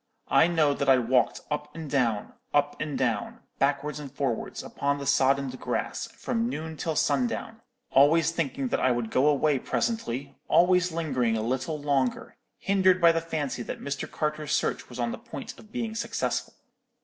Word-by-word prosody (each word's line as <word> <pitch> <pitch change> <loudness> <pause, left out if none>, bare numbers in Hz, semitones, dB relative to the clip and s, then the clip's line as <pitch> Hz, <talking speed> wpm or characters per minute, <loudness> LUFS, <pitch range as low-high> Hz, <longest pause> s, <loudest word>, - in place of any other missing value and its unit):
I 160 - +6
know 160 -4 +3
that 140 -1 -1
I 135 - +7
walked 125 +1 +2
up 150 0 -3
and 160 -2 -6
down, 120 -7 0 0.2
up 145 0 +2
and 150 -2 -2
down, 115 -5 -1 0.2
backwards 145 +2 0
and 140 -3 -8
forwards, 135 -4 -3
upon 140 0 -1
the 140 - -6
soddened 135 -1 +2
grass, - - -2
from 230 -1 -1
noon 160 -7 -5
till 160 +1 -2
sundown, 225 - 0 0.3
always 155 +5 +5
thinking 140 -5 -2
that - - 0
I 130 - +3
would 120 -2 -1
go 130 +3 +3
away 150 -1 +3
presently, 140 - -2
always 180 +1 +4
lingering 130 -9 0
a 110 - -2
little 130 +6 -2
longer; 140 -3 0 0.2
hindered 190 -2 +3
by 170 -1 +7
the 165 0 0
fancy 155 -6 -3
that - - -5
Mr. 140 -1 -4
Carter's 150 -1 -2
search - - -1
was 125 - -9
on 120 -1 -1
the - - -6
point 250 -1 -8
of 215 - -16
being 230 -3 -3
successful. 225 - -2
145 Hz, 175 wpm, -27 LUFS, 130-165 Hz, 0.3 s, I